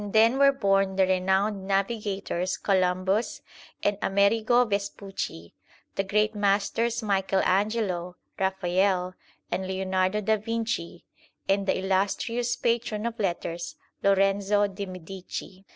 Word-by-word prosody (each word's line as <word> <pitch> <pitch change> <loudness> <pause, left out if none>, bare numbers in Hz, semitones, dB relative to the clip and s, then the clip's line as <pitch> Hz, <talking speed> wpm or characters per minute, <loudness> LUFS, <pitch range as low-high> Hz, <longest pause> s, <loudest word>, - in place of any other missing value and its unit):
xl - - -5
THE - - -5
SIKH - - -10
RELIGION 225 +1 +7
then 265 - -3
were 280 0 +7
born 195 -2 +2
the 190 0 +4
renowned 190 +2 +1
navigators 195 -2 -1
Columbus 190 +2 0 0.4
and 205 0 +1
Amerigo 220 +5 +3
Vespucci, 200 - -4 0.4
the 195 - 0
great 210 +2 +1
masters 210 +3 +1
Michael 195 -2 +1
Angelo, 190 -3 0 0.2
Raphael, 190 -1 +1 0.4
and 185 +2 -2
Leonardo 190 +1 0
da 220 +1 +2
Vinci, 220 -5 -3 0.4
and 195 0 +1
the - - +2
illustrious 205 +6 0
patron 230 -2 -1
of 235 -1 -3
letters 170 -3 -3 0.3
Lorenzo 195 +1 +3
di 200 0 -5
Medici. 185 +1 -8
195 Hz, 125 wpm, -27 LUFS, 190-210 Hz, 0.4 s, RELIGION